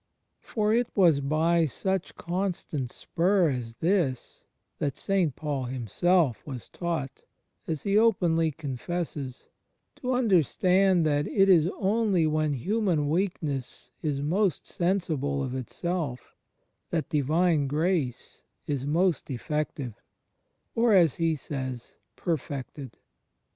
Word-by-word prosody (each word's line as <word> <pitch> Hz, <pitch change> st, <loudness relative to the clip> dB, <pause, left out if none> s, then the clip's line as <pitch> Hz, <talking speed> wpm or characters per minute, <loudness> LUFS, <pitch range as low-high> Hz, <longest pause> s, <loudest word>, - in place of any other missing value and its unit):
For 215 Hz, -1 st, 0 dB
it 240 Hz, +1 st, +2 dB
was 170 Hz, -7 st, +5 dB
by 160 Hz, +4 st, +2 dB
some 190 Hz, +8 st, -2 dB
such 190 Hz, -2 st, -2 dB
constant 175 Hz, -7 st, -3 dB
spur 180 Hz, -, +1 dB
as 120 Hz, -3 st, -5 dB
this 165 Hz, -7 st, -1 dB, 0.4 s
that 140 Hz, -3 st, -2 dB
St. 185 Hz, -8 st, 0 dB
Paul 145 Hz, -4 st, -3 dB
himself 130 Hz, -, +1 dB
was 130 Hz, -5 st, -8 dB
taught,^ 165 Hz, -6 st, -4 dB, 0.5 s
as 160 Hz, -4 st, -3 dB
he 200 Hz, +1 st, +3 dB
openly 175 Hz, -8 st, +3 dB
confesses, 145 Hz, -1 st, -5 dB, 0.5 s
to 255 Hz, 0 st, -2 dB
understand 185 Hz, -, +3 dB
that 145 Hz, -1 st, +1 dB
it 195 Hz, -1 st, +3 dB
is 170 Hz, -3 st, +5 dB
only 200 Hz, -4 st, +2 dB
when 155 Hz, -1 st, +1 dB
human 175 Hz, -, 0 dB
weakness 150 Hz, -8 st, -2 dB
is 145 Hz, -3 st, -1 dB
most 185 Hz, +5 st, +1 dB
sensible 155 Hz, -7 st, -1 dB
of 130 Hz, -1 st, -3 dB
itself 130 Hz, 0 st, -4 dB, 0.6 s
that 165 Hz, -2 st, -2 dB
Divine 155 Hz, +1 st, +2 dB
Grace 155 Hz, -3 st, -1 dB, 0.2 s
is 140 Hz, -2 st, -2 dB
most 170 Hz, +3 st, +1 dB
effective, 140 Hz, -2 st, -3 dB, 0.7 s
or, 230 Hz, -1 st, +3 dB
as 170 Hz, -7 st, +4 dB
he 165 Hz, -1 st, +1 dB
says, 130 Hz, -4 st, -6 dB, 0.2 s
"perfected." 140 Hz, -5 st, -4 dB
160 Hz, 115 wpm, -27 LUFS, 140-185 Hz, 0.7 s, was